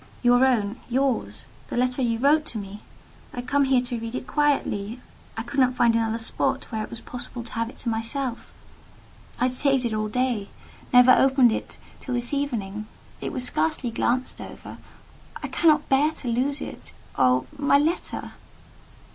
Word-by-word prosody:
"Your 245 +1 +5
own: 230 -2 0
yours—the 260 -1 -2
letter 255 +1 +1
you 230 -2 +1
wrote 290 +5 +4
to 230 - -5
me. 205 0 -7 0.5
I - - -9
had 245 0 -5
come 280 +1 +3
here 260 -2 +3
to 245 -1 -3
read 230 +1 -5
it 255 - -4
quietly. 250 -7 0 0.4
I 225 - -2
could 240 +4 -3
not 255 -1 +4
find 235 -2 +4
another 225 0 +1
spot 225 - -1
where 220 -2 -2
it - - -7
was 235 - -7
possible 245 -1 -7
to 230 - -11
have 230 0 -2
it - - -14
to - - +1
myself. 230 +3 -3 0.9
I - - +1
had 255 - +3
saved 270 -1 +2
it 230 - -1
all 215 0 -1
day—never 250 +2 +2
opened 265 -2 +5
it - - -4 0.2
till 255 - -4
this 240 +2 0
evening: 215 -7 -2 0.3
it - - -3
was 260 -6 -2
scarcely 230 - 0
glanced 250 +3 -1
over: - - -10 0.6
I - - -1
cannot 310 -2 +3
bear 275 +3 +4
to 260 - -9
lose 270 +5 0
it. - - -8 0.2
Oh, 130 -1 +3
my 285 -1 +4
letter!" 315 +5 -1
245 Hz, 175 wpm, -25 LUFS, 225-270 Hz, 0.9 s, Your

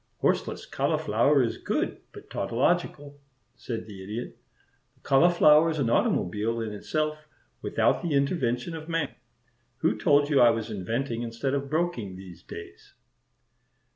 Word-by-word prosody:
"Horseless - - 0
cauliflower 130 +6 +2
is 115 - -2
good, - - -2
but - - -13
tautological," 145 0 -1 0.4
said 115 -3 -5
the 100 -3 -10
Idiot. 105 +5 -6 0.6
"The - - -32
cauliflower 155 +1 +5
is 160 - -2
an 125 -5 0
automobile 110 +3 +1
in 110 -2 -4
itself, 155 +7 -3 0.3
without - - +1
the 165 -4 -1
intervention 140 -1 0
of 160 +1 -8
man. 165 -4 -1 0.7
Who 110 - +2
told 145 +6 +3
you 140 - +5
I 120 - +8
was 115 -1 -2
inventing 115 +5 -2
instead 120 +3 -3
of 140 0 -2
broking 155 - -1
these 90 -3 -11
days?" 85 - -11
130 Hz, 140 wpm, -27 LUFS, 110-150 Hz, 0.7 s, I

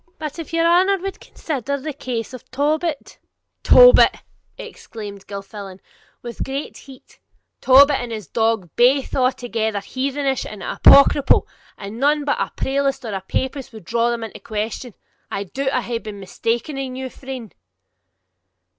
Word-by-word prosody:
'But 305 +1 -6
if 330 - -7
your 330 0 +1
honour 370 +4 +4
wad 390 +1 -6
consider 280 -2 -4
the 295 +2 -5
case 250 -3 -5
of 255 - -11
Tobit 300 +3 -2 0.2
' - - -56
'Tobit!' - - +7 0.4
exclaimed 205 -3 -9
Gilffflan, 200 -1 -8 0.4
with 240 -1 -5
great 275 +2 -5
heat; 265 -2 -15 0.4
'Tobit 275 +2 +6
and 245 -1 -5
his 215 -3 -5
dog 225 -7 0
baith 260 +3 +3
are 255 - +3
altogether 230 -4 -1
heathenish 270 +4 -2
and 210 -2 -9
apocryphal, 280 0 +5 0.3
and 205 +3 -8
none 290 +2 +2
but 285 - 0
a - - -2
prelatist 275 -1 -1
or 220 - -4
a 190 - -3
papist 265 +7 -3
would 220 -6 -12
draw 235 +4 +1
them 235 -1 -2
into 225 - -8
question. 220 +2 -5 0.3
I 200 - -3
doubt 265 +8 -3
I 255 - 0
hae 235 -1 -3
been 215 -3 -8
mista'en 230 +8 -3
in 255 -1 -6
you, 260 0 -4
friend.' 260 -5 -8
255 Hz, 155 wpm, -21 LUFS, 220-280 Hz, 0.4 s, Tobit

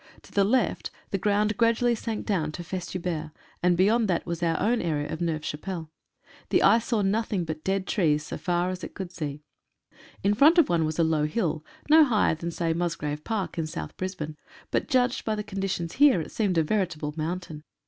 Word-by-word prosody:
To - - -17
the 200 - +3
left 230 +3 +1 0.2
the 195 - 0
ground 210 +2 +1
gradually 235 +1 +3
sank 225 -1 -4
down 160 -7 0
to 175 - -6
Festubert, 175 -3 -4 0.3
and 175 0 +3
beyond 215 +5 +3
that 175 -3 0
was 170 0 -4
our 165 -1 +1
own 235 +2 +2
area 150 -3 -1
of 160 - -5
Neuve 160 -3 -1
Chapelle. 160 0 -5 0.6
The - - +3
eye 230 - +6
saw 225 -2 -1
nothing 200 -2 0
but 155 -1 -5
dead 195 0 0
trees, 155 -8 +1
so - - -5
far 175 0 0
as 185 - -6
it - - -7
could 190 -3 -6
see. 150 -4 -5 0.8
In 200 +1 +3
front 295 +10 +6
of 335 - +5
one 165 -2 +2
was 155 0 -3
a 170 - +4
low 160 -2 +2
hill, 155 -2 -1 0.2
no 315 +1 +8
higher 230 - +3
than, 165 +2 -4
say, 165 -1 -1
Mus 170 0 -1
grave 150 0 -4
Park 210 -6 -3
in 160 - -1
South 75 - -6
Brisbane, 160 -5 -5 0.3
but - - 0
judged 250 -2 +2
by 220 - -1
the 210 - -3
condi 195 -1 -3
tions 170 -2 -3
here, 285 -8 +5
it 160 - -6
seemed 200 -6 0
a 165 - +4
veritable 165 -5 -1
mountain. 160 -1 -4
180 Hz, 210 wpm, -26 LUFS, 160-210 Hz, 0.8 s, no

